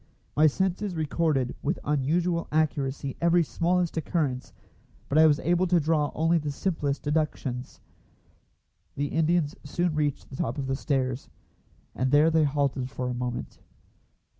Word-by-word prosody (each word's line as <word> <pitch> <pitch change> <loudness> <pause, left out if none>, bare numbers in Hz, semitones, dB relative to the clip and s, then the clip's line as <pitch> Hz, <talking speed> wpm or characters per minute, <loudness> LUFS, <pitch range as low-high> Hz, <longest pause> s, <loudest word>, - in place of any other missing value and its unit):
My 155 +1 +6
senses 190 +4 -1
recorded 155 -4 0
with 160 +6 -1
unusual 165 +4 0
accuracy 140 -3 0
every 170 0 +4
smallest 175 +2 0
occurrence, 145 -5 -1 0.6
but 150 - +2
I 160 - +8
was 150 -1 +3
able 175 +2 +2
to 175 0 +4
draw 150 -1 +1
only 165 +2 +3
the 150 -1 -4
simplest 145 -2 -2
deductions. 145 -4 -2 1.1
The 145 0 -1
Indians 160 -1 +1
soon 170 +3 -1
reached 150 -3 -2
the 130 - -7
top 115 - -2
of 140 - -2
the 135 0 -1
stairs, 135 -2 -1 0.6
and 130 +1 0
there 150 +4 +5
they 160 -1 +4
halted 140 -3 0
for 125 -1 -3
a - - -2
moment. 125 0 -4
150 Hz, 145 wpm, -27 LUFS, 135-165 Hz, 1.1 s, I